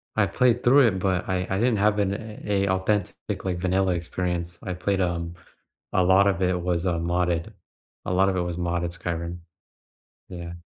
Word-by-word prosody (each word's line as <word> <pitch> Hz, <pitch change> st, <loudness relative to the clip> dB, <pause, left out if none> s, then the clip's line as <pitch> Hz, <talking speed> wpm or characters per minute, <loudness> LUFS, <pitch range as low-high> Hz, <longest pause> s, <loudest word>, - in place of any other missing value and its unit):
I 110 Hz, -, +4 dB
played 120 Hz, +4 st, +2 dB
through 130 Hz, +1 st, +6 dB
it, 95 Hz, -4 st, 0 dB
but 95 Hz, -1 st, 0 dB
I 90 Hz, -1 st, -1 dB
I 95 Hz, -, 0 dB
didn't 120 Hz, -1 st, +2 dB
have 105 Hz, +1 st, +2 dB
an 100 Hz, -1 st, +1 dB
a 105 Hz, -2 st, -2 dB
a -, -, -1 dB
authentic, 95 Hz, +1 st, -1 dB
like, 90 Hz, -2 st, -1 dB
vanilla 95 Hz, +1 st, +1 dB
experience, 85 Hz, 0 st, -3 dB
I 95 Hz, -, -3 dB
played 95 Hz, +2 st, -1 dB
um, 85 Hz, -1 st, -2 dB, 0.6 s
a 95 Hz, -, +3 dB
lot 95 Hz, +2 st, +5 dB
of 95 Hz, -2 st, +1 dB
it 90 Hz, -1 st, +1 dB
was 90 Hz, 0 st, -1 dB
a 90 Hz, -, +2 dB
modded 85 Hz, 0 st, -1 dB, 0.5 s
a -, -, -1 dB
lot 95 Hz, +1 st, +4 dB
of 95 Hz, -, -1 dB
it 90 Hz, -, +1 dB
was 85 Hz, -1 st, -3 dB
modded 85 Hz, -1 st, -1 dB
Skyrim. 85 Hz, 0 st, -4 dB, 0.9 s
Yeah. 85 Hz, -2 st, -7 dB
90 Hz, 190 wpm, -25 LUFS, 85-100 Hz, 0.9 s, through